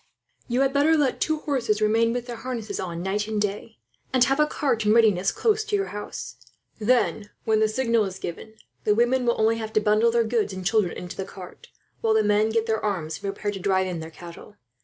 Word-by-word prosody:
"You 245 +2 +1
had 270 0 +2
better 300 +3 +4
let 280 -4 0
two 315 0 +1
horses 235 -7 0
remain 225 +2 +3
with 245 0 -3
their 240 -2 -6
harness 225 -5 -5
on, 170 -2 -4
night 205 +2 -1
and 215 -1 -2
day; 205 +2 -3 0.3
and 255 -2 +4
have 270 +3 +1
a 300 - +4
cart 265 -7 -1
in 210 0 +3
readiness, 205 -5 +4
close 435 -1 +1
to 430 -1 -1
your 395 -1 -1
house. 210 0 -7 0.4
Then, 220 -2 +1
when 220 -1 +2
the 220 - +4
signal 230 -1 +1
is 190 -1 -6
given, 190 +5 -7 0.3
the 210 - +3
women 245 +2 +2
will 235 - +1
only 225 +1 +3
have 220 -1 -6
to - - +4
bundle 215 +2 +3
their 235 0 +2
goods 220 -3 -1
and 185 -1 -7
children 200 -3 +1
into 180 - -7
the 195 - -2
cart; 185 -2 -12 0.3
while 220 -1 +2
the 220 - +4
men 210 +1 +3
get 225 0 0
their 220 -1 -1
arms, 175 -7 -2
and - - -18
prepare 205 +1 -3
to 195 - -6
drive 190 0 +1
in 180 -3 -4
their 160 0 -7
cattle. 170 +4 -12
220 Hz, 230 wpm, -25 LUFS, 205-240 Hz, 0.4 s, better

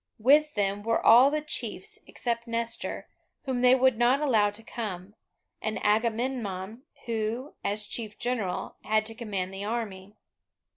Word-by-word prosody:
With 295 +6 +4
them 200 -1 0
were 230 +2 +1
all 245 +5 +7
the 300 +1 -1
chiefs 305 - -4
except 235 -1 -3
Nestor, 230 0 -3 0.4
whom 260 -3 -2
they 250 0 +7
would 260 -3 +3
not 245 +3 +4
allow 225 -9 +3
to 205 +2 -12
come, 205 -4 -6 0.5
and 220 0 -2
Agamemnon, 220 -1 0 0.2
who, 230 +4 -2
as 205 +1 0
chief 215 0 -5
general, 240 -7 -2
had 215 0 +1
to 225 - -4
command 200 -5 -4
the 195 +1 -5
army. 205 -3 -4
225 Hz, 145 wpm, -28 LUFS, 205-245 Hz, 0.5 s, all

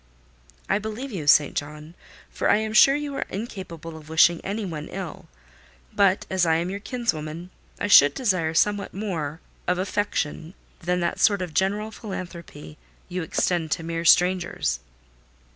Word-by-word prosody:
"I - - +1
believe 220 +6 -6
you, 165 -8 -5
St. 145 0 +5
John; 150 +2 -6 0.4
for - - -1
I - - +6
am 220 0 -3
sure 270 +5 +7
you 290 -1 -3
are - - -2
incapable 185 -6 -7
of 155 -1 -12
wishing 160 +1 +4
any 205 +2 -3
one 155 -4 -6
ill; 190 -2 -7 0.7
but, 195 -1 +3
as 190 -2 0
I 165 -1 +3
am 170 +3 -1
your 200 - -4
kinswoman, 175 -7 -4 0.3
I - - -1
should 145 -8 +7
desire 180 -10 0
somewhat 205 +2 +1
more 170 -7 -4 0.3
of 180 0 +1
affection 185 -4 -2 0.2
than 180 +1 -1
that 170 - -1
sort 200 -3 +3
of 175 -3 -7
general 205 +4 0
philanthropy 170 - -8 0.3
you 180 +1 -3
extend 165 0 0
to 170 - -5
mere 165 0 -3
strangers." 180 - +3
180 Hz, 160 wpm, -24 LUFS, 160-205 Hz, 0.7 s, sure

